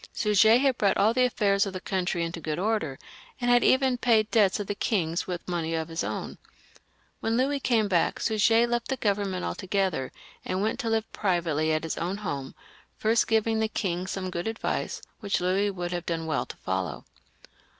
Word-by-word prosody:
Suger 220 +1 +5
had 265 -1 +1
brought 200 -2 +3
all 215 +3 +4
the 255 +1 +3
affairs 200 -4 +2
of 195 - -5
the 185 - -4
country 180 -2 -1
into 165 0 -4
good 155 -2 -3
order, 190 -8 -1 0.4
and 245 -1 +1
had 245 0 +5
even 260 -2 +3
paid 220 -3 +3
debts 210 -3 +3
of 205 - -3
the 205 - -2
king's 175 -5 -1
with 175 -2 -5
money 165 -2 -2
of 160 0 -3
his 165 +1 -3
own. - - -5 0.8
When 225 +1 0
Louis 275 +3 +1
came 230 -5 +2
back 180 -4 +1
Suger 225 +1 +3
left 240 0 -1
the 265 - -2
government 200 -4 -1
altogether, 190 -8 -1 0.3
and 185 - -2
went 220 - -1
to 230 - -1
live 225 0 -1
privately 165 -5 0
at 155 0 0
his 165 - -3
own 180 +4 -2
home, 145 -10 -5 0.4
first 225 +2 +2
giving 225 0 +2
the 220 - +1
king 185 -4 -2
some 185 -1 -4
good 170 +3 -3
advice, 225 0 -3 0.2
which 200 -3 -1
Louis 190 +3 +1
would 175 -3 -4
have 175 -1 -4
done 165 -1 -2
well 155 -2 -1
to - - -9
follow. 95 -5 -3
195 Hz, 195 wpm, -27 LUFS, 175-225 Hz, 0.8 s, Suger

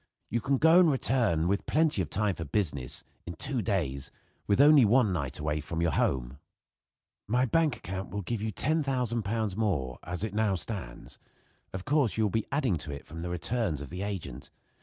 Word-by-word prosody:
You 120 +1 0
can 140 +2 +1
go 160 +5 +6
and 175 -3 +6
return, 115 - +2
with 100 +2 -1
plenty 155 -9 +2
of 80 - -3
time 105 +2 0
for 80 - -6
business, 70 - -2 0.2
in 85 - -5
two 125 - -1
days, 80 - -2 0.4
with 100 - +2
only 145 -1 +8
one 110 -2 +4
night 70 -5 -2
away 75 0 -2
from 85 +1 -4
your 85 -2 +2
home. 65 -1 -1 0.9
"My 125 +4 +2
bank 155 +1 +2
account 95 0 -6
will 100 +2 -4
give 110 +4 -3
you 110 0 -2
£10,000 120 - -1
more, 80 - -1
as 90 +3 -5
it 110 - -3
now 105 -2 +1
stands. 85 - -6 0.5
Of 95 0 -6
course 140 -6 +2
you 110 - +2
will 105 - +1
be 110 +2 -1
adding 130 - +1
to 75 - -6
it 70 - -7
from 80 - -9
the 85 +1 -4
returns 90 - -1
of 70 -2 -8
the 90 +2 -5
agent. 85 -11 -5
100 Hz, 195 wpm, -29 LUFS, 80-120 Hz, 0.9 s, only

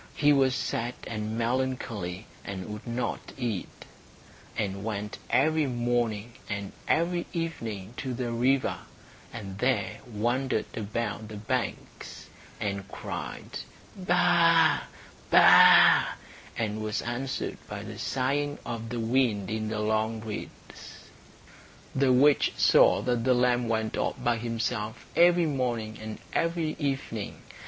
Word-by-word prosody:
He 145 0 +4
was 135 -2 +3
sad 120 -2 -2
and 110 0 -4
melancholy, 115 -6 -2 0.2
and 95 0 -6
would 105 +3 -9
not 120 +1 -3
eat, 115 -8 -4 0.7
and 100 -2 -2
went 105 -1 -4
every 155 +2 +3
morning 120 -3 -1 0.2
and 100 -1 -4 0.2
every 175 +1 +1
evening 115 - -4
to 130 -2 -3
the 120 -1 -3
river, 130 +3 +1 0.5
and 100 -4 -7
there 125 -4 0
wandered 120 +2 0
about 110 0 -3
the 110 - -8
banks, 115 +4 -4 0.3
and 100 -1 -3
cried, - - -6 0.4
"Baa, 175 -3 +4 0.5
baa," - - +8 0.4
and 110 -2 -2
was 110 0 -2
answered 125 +3 -3
by - - -5
the - - -8
sighing 145 +3 -1
of 115 -1 -5
the 120 0 -3
wind 115 -4 +1
in 110 0 -2
the 105 0 -2
long 110 +1 0
reeds. 110 -2 -9 0.9
The 135 -1 +3
witch 140 +3 +4
saw - - +5
that 120 -2 0
the 130 0 +3
lamb 125 -1 +2
went 110 -1 -1
off - - 0
by 120 -1 +2
himself 115 -1 -3
every 175 0 +5
morning 120 -7 -2
and 110 0 -6 0.2
every 165 -2 0
evening. 135 -7 -3
120 Hz, 125 wpm, -28 LUFS, 110-135 Hz, 0.9 s, baa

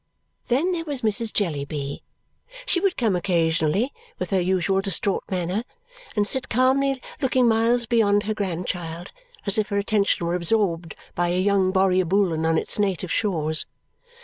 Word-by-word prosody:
Then 280 +9 +1
there 340 -2 -2
was 285 -6 -4
Mrs. 215 +1 +2
Jellyby. 145 -6 -3 0.6
She 435 -8 +2
would 385 0 0
come 220 -6 +1
occasionally, 170 - +1 0.2
with 185 - -5
her 190 -2 +2
usual 190 +1 +1
distraught 195 0 +1
manner, 185 +3 -2 0.5
and 205 -1 +1
sit 265 +2 0
calmly 265 +2 +2 0.2
looking 255 -2 +2
miles 230 +2 +2
beyond 210 -3 +2
her 215 0 -2
grandchild 175 -3 -4 0.3
as 200 +1 +4
if 210 - -1
her 200 - -1
attention 200 -3 +1
were 170 - -1
absorbed 175 -3 0 0.2
by 175 0 0
a 180 +1 0
young 190 -1 +2
Borrioboolan 185 -3 +2
on 165 0 +2
its - - 0
native 190 -3 -1
shores. 160 -7 0
195 Hz, 150 wpm, -23 LUFS, 175-225 Hz, 0.6 s, as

